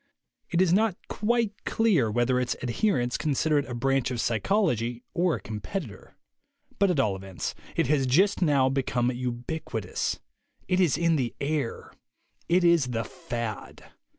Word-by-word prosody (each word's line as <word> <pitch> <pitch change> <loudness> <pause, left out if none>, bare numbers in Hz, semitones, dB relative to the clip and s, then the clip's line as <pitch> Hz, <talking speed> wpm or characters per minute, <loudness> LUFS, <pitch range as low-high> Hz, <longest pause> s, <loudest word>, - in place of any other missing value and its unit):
It 175 +1 +3
is 175 -2 +2
not 210 -1 +2
quite 220 -1 0
clear 190 - +2
whether 120 +3 +2
its 125 - -1
adherents 125 - 0
consider 150 0 +2
it 140 - -4
a 120 - -4
branch 135 +1 +1
of 125 -2 -3
psychology 120 - 0
or 175 -2 +2
a - - -5
competitor. 110 - -6 0.6
But 200 -1 +4
at 175 -6 +1
all 105 -6 +2
events, 95 -2 -5 0.2
it - - +2
has 135 -1 +2
just 190 +11 +3
now 145 -6 +4
be 135 +1 +1
come 125 -1 0
ubiquitous. 120 - -3 0.5
It 185 0 +1
is 170 -6 +3
in 165 -1 +2
the 125 -4 -2
air. 140 -4 -2 0.6
It 180 +1 +4
is 170 -6 +4
the 115 -2 -2
fad. 120 - -6
135 Hz, 155 wpm, -27 LUFS, 120-175 Hz, 0.6 s, But